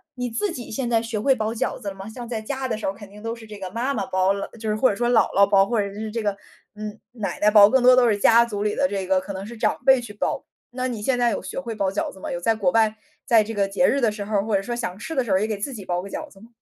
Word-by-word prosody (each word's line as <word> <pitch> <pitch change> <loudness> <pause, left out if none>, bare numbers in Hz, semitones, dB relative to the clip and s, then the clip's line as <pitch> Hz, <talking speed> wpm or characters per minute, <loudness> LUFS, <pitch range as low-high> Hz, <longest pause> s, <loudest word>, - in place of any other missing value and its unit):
你 250 -1 -3
自 335 - -2
己 245 -3 -7
现 240 +2 -2
在 230 -1 +3
学 225 -2 -3
会 265 +5 +3
包 220 -1 -2
饺 225 - -2
子 205 -5 -5
了 195 - -9
吗？ 195 +1 -9
像 240 +1 -8
在 230 -3 -2
家 265 +4 -4
的 245 - -2
时 220 - -6
候 190 - 0
肯 200 0 -12
定 210 +1 -13
都 230 +1 -4
是 230 - -12
这 210 -1 -10
个 190 -1 -5
妈 245 +5 -1
妈 205 -7 -2
包 185 0 +1
了， 200 0 -2
就 220 -1 -4
是 210 - +1
或 255 - +4
者 205 - -1
说 240 +3 0
姥 240 -2 +5
姥 200 - +7
包， 195 -1 +4
或 230 -1 +1
者 200 -1 -4
是 215 +2 -5
这 230 +1 -3
个， 205 - +2 0.4
嗯， 210 0 -6
奶 210 -7 -4
奶 210 0 +5
包， 205 -1 +8
更 265 +1 +3
多 255 +1 +8
都 250 -1 +5
是 210 -3 +2
家 230 +3 +5
族 205 -3 -4
里 210 0 0
的 280 - +2
这 195 -6 -3
个， 190 0 +2
可 190 +2 -7
能 190 +1 -6
是 235 +2 -9
长 220 +3 +1
辈 265 -1 +6
去 235 -4 -8
包。 205 - -2 0.2
那 255 +1 -3
你 235 -4 -4
现 245 +3 0
在 240 -1 +3
有 - - -3
学 190 - -5
会 235 -4 -5
包 195 -3 0
饺 195 - -2
子 190 - -13
吗？ - - -5
有 175 - -3
在 225 +6 +1
国 195 -5 +1
外， 220 0 +3 0.3
在 230 -5 +5
这 225 +2 -6
个 200 -2 +1
节 200 +7 +1
日 280 - +3
的 225 -4 +2
时 210 - -5
候 210 +1 -1
儿， 200 - 0
或 220 -2 0
者 195 - +2
说 240 +5 -4
想 230 -6 -4
吃 240 +10 -6
的 265 -4 0
时 215 - -3
候 190 - +4
儿 - - +1
也 215 - 0
给 215 -2 -2
自 235 +7 -4
己 210 -5 -7
包 175 0 -1
个 195 - -8
饺 310 +9 -6
子 195 - -18
吗？ 225 - -15
215 Hz, 375 characters per minute, -23 LUFS, 200-240 Hz, 0.4 s, 包